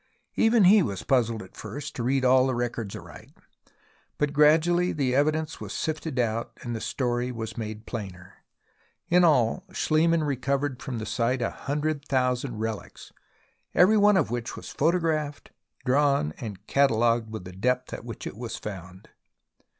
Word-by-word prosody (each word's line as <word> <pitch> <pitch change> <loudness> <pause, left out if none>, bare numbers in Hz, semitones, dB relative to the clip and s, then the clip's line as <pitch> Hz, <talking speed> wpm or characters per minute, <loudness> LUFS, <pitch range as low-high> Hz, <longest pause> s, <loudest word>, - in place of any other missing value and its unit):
Even 225 -1 +4
he 200 +3 +7
was 100 - -3
puzzled 115 -5 +1
at 95 - -16
first 145 0 -7
to - - -4
read 130 +2 +1
all 130 +1 +5
the 130 - 0
records 120 -4 -3
aright, - - -11 0.9
but 150 -1 0
gradually 165 +4 +4
the 135 -4 0
evidence 155 +3 0
was - - -6
sifted 155 -3 -3
out 115 -1 -1
and 120 -1 -4
the 110 - -5
story 125 -1 -1
was 115 -2 -6
made 110 -1 -6
plainer. 95 -5 -7 0.8
In 180 0 +5
all, 145 0 +3
SchHemann 165 -2 +2
recovered 140 0 -1
from 130 -3 -4
the 110 - -4
site 125 +2 0
a - - -1
hundred 150 +1 -2
thousand 125 -3 0
relics, 110 -1 -6 0.6
every 190 +5 +6
one 205 -1 +5
of 150 - +1
which 120 -1 -3
was - - -9
photographed, 155 -2 0 0.3
drawn 140 - +2
and 100 -3 -7
catalogued 115 -4 +2
with 110 -4 -6
the 90 - -8
depth 125 +7 -1
at - - -6
which 115 -2 -8
it - - -6
was 115 -1 -5
found. 95 -2 -9
130 Hz, 160 wpm, -26 LUFS, 115-150 Hz, 0.9 s, he